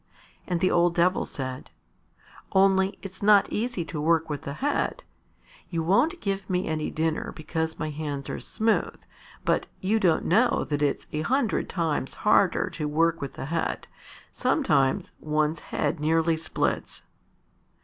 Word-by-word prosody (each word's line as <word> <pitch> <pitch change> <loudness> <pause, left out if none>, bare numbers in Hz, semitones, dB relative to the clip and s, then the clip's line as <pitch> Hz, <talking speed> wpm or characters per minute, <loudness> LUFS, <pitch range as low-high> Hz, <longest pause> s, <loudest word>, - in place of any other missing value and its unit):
And 175 -2 -1
the 185 - +3
old 175 0 +3
Devil 180 +2 +2
said, 130 -3 -6 0.8
"Only 190 0 +3
it's 190 -1 -9
not 205 -1 +6
easy 225 -6 -2
to 155 -2 -5
work 160 0 +2
with 145 -1 -3
the 140 -3 -5
head. 285 - -1 0.7
You 165 -2 -1
won't 250 - +2
give 195 -1 -3
me 180 0 0
any 155 -1 -1
dinner 160 0 -1
because 160 +1 -3
my 155 -1 -3
hands 145 -2 -4
are - - -4
smooth, 220 0 0 0.5
but - - +1
you 210 +4 +1
don't 175 -6 +2
know 230 +8 +3
that 145 -1 -1
it's 145 -1 0
a 155 - -2
hundred 240 - 0
times 160 -6 -1
harder 200 -3 +3
to 150 -2 -3
work 165 +2 +1
with 140 - -5
the - - -5
head. 165 +3 -2 0.5
Sometimes 140 - +1
one's 155 +1 0
head 175 - -2
nearly 160 +2 +2
splits." 160 0 -2
165 Hz, 150 wpm, -26 LUFS, 155-195 Hz, 0.8 s, not